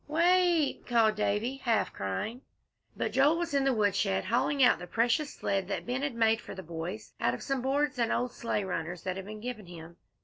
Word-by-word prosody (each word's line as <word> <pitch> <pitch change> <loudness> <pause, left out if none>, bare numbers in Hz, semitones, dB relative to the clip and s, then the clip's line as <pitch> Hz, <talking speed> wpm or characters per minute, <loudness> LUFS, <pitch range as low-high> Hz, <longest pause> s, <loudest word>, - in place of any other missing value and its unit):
"Wa 310 +2 0
it," 350 -4 +3
called 230 -3 +4
Davie, 215 +5 -1
half 235 -4 0
crying. 100 - -3 0.6
But 220 - -1
Joel 275 +7 +4
was 340 -2 -3
in 275 -1 +2
the 270 - +4
woodshed, 200 -4 +1
hauling 255 +6 +2
out 250 - +5
the 180 - -8
precious 245 - +1
sled 195 -2 -1
that - - -3
Ben 250 +2 -2
had 280 -4 -2
made 225 0 +3
for - - -9
the 190 - -7
boys 170 +6 -6
out 120 - +2
of - - -9
some 275 -2 -1
boards 285 +1 0
and 235 - +1
old 245 0 0
sleigh 230 -3 -2
runners 175 -2 -4
that 185 -1 -2
had 190 0 -6
been 215 +1 -8
given 225 -5 -6
him. 170 -1 -11
230 Hz, 215 wpm, -30 LUFS, 195-270 Hz, 0.6 s, out